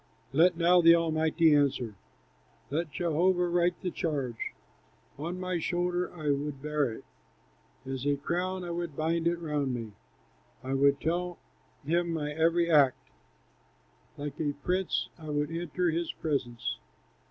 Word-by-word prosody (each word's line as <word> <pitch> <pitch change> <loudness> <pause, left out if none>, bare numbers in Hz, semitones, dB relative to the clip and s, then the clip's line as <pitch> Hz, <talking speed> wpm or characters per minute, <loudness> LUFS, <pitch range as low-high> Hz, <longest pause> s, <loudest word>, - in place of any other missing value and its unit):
Let 170 +4 +5
now 175 +1 +5
the 165 0 +8
Almighty 160 -1 +3
answer, 140 -6 +2 0.8
Let 155 +1 -1
Jehovah 175 +3 +2
write 175 0 +1
the 180 - -1
charge! 140 -10 -3 0.7
On 170 +4 -4
my 185 -1 -1
shoulder 175 +1 -1
I 155 -3 0
would 140 0 -2
bear 150 -3 0
it, 110 - -9 0.8
As 135 +1 -3
a 145 - +3
crown 180 +5 -2
I 175 - -4
would 170 -3 -4
bind 165 +1 +1
it 170 0 +1
round 150 -6 -1
me; 115 -3 -5 0.7
I 130 - -3
would 140 +1 +4
tell 175 +2 -1 0.5
him 170 +3 +1
my 150 -2 -2
every 165 +2 +2
act; 145 -6 +3 1.1
Like 145 0 -6
a 145 -2 0
prince 185 0 0
I 155 -1 -8
would 150 +1 -1
enter 175 +1 -1
his 165 +1 -1
presence!" 130 -7 -2
160 Hz, 140 wpm, -29 LUFS, 145-175 Hz, 1.1 s, the